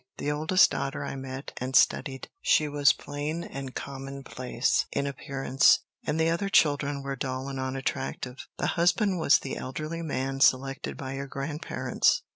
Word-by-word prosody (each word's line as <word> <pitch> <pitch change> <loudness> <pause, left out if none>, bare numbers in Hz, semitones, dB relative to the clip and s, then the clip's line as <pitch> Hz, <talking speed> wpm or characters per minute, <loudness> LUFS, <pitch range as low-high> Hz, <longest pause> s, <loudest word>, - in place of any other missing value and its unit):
The 145 - -1
oldest 155 +5 +4
daughter 135 +1 -3
I 140 - -4
met 135 +1 -7
and 130 +1 -3
studied. 135 -1 +3
She 155 - +3
was 145 0 +4
plain 150 +4 -4
and 135 -5 -7
commonplace 135 -2 -2
in 140 - -1
appearance, 135 -1 +2 0.3
and 155 - 0
the 160 - +3
other 195 +4 -1
children 145 -5 +2
were 140 0 -3
dull 130 0 -3
and 135 -1 -4
unattractive. 130 -1 -3
The - - -1 0.2
husband 185 +2 +3
was 160 -2 +6
the 135 - -5
elderly 155 +5 -4
man 135 -3 -2
selected 135 +1 +2
by 130 -1 -5
your 140 +1 -4
grandparents. 140 +3 0
140 Hz, 155 wpm, -28 LUFS, 135-150 Hz, 0.3 s, was